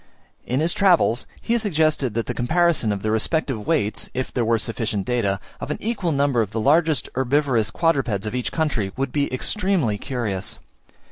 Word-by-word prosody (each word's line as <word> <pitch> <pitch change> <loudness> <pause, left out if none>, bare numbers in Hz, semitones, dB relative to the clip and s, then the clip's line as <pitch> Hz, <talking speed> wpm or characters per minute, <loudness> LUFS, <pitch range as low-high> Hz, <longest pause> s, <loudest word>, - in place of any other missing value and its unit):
In 130 +4 0
his 165 +2 +1
Travels, 175 - +3
he 230 - -1
has 235 - +3
suggested 155 - +1
that 115 - 0
the - - -3
comparison 160 -2 +2
of 100 -1 -3
the 110 - 0
respective 115 -1 -1
weights 105 +1 0
(if 130 0 -3
there 125 - +1
were 115 0 +2
sufficient 110 -3 -2
data) 105 -6 0 0.2
of - - -6
an 150 - -2
equal 205 -6 -1
number 140 -4 +2
of 105 - -1
the 110 +2 -3
largest 150 +2 +3
herbivorous 130 -4 +1
quadrupeds 130 - 0
of 105 - -3
each 125 -1 -2
country 135 -12 -1
would 135 -1 -1
be 145 0 0
extremely 155 - 0
curious. 110 -8 -2
130 Hz, 185 wpm, -22 LUFS, 110-160 Hz, 0.2 s, Travels